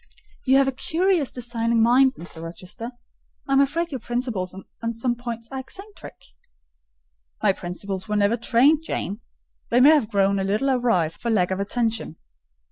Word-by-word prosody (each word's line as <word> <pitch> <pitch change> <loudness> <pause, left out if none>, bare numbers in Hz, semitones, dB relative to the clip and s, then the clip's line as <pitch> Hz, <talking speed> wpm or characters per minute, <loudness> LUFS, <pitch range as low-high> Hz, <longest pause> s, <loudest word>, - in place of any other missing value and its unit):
"You 265 0 +5
have 275 -1 +4
a - - +2
curious, 330 +2 0
designing 235 -1 -1
mind, 260 +3 +5
Mr. 170 -1 -10
Rochester. 180 +7 -7 0.6
I 275 - 0
am 270 - +6
afraid 330 +5 0
your 265 - -3
principles 240 -6 -3 0.3
on 230 0 -2
some 240 +2 0
points 235 -1 -6
are 265 - -4
eccentric." 390 +10 -9 1.3
"My - - +4
principles 190 +2 -5
were 210 - 0
never 205 +2 +3
trained, 255 +6 +3
Jane: 210 - -4 0.5
they 240 - +3
may 280 +4 +8
have 290 -9 +3
grown 200 -1 +2
a - - 0
little 215 +8 +1
awry 235 -11 +2
for 235 +8 -6
want 185 -4 +2
of 190 - -1
attention." 225 -2 -1
235 Hz, 165 wpm, -23 LUFS, 200-265 Hz, 1.3 s, may